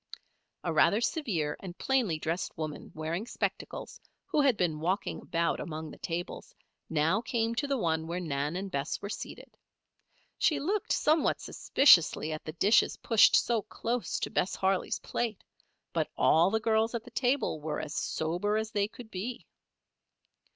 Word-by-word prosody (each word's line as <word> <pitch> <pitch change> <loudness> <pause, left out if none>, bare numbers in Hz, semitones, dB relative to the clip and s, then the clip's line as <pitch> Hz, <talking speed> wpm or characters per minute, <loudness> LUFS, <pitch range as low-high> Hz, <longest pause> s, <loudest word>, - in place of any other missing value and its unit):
A - - -1
rather 210 - +4
severe 195 - -1
and 180 -2 -8
plainly 245 -12 +1
dressed 165 +3 -3
woman, 155 -2 -5
wearing 165 +7 -3
spectacles, - - -4 0.2
who 300 - +1
had 270 -6 +3
been 160 -4 0
walking 185 +6 -1
about 170 0 0
among 155 -1 -5
the - - -12
tables, 175 +1 -5 0.3
now 165 +7 +2
came 230 -1 -1
to 285 +5 -1
the 275 -1 0
one 160 -5 0
where 170 +2 -2
Nan 150 -2 -2
and 195 +1 -4
Bess 140 +2 -2
were 200 - -6
seated. - - -8 0.8
She 300 -3 +3
looked 380 +8 -1
somewhat 310 0 +2
suspiciously 170 - +4
at 155 - -5
the 155 - -6
dishes 205 +7 +3
pushed 225 -3 +5
so 235 -2 +3
close 235 +4 -3
to - - -2
Bess 185 - 0
Harley's 190 0 0
plate; 225 -4 -3 0.5
but - - 0
all 165 +3 +5
the 220 +2 +1
girls 220 +1 +1
at 230 - -3
the 245 - -13
table 245 - 0
were 150 0 -3
as 150 -2 -5
sober 175 +7 -1
as 220 0 -2
they 205 -1 +1
could 220 +1 -12
be. 235 +7 -5
195 Hz, 165 wpm, -30 LUFS, 160-235 Hz, 0.8 s, pushed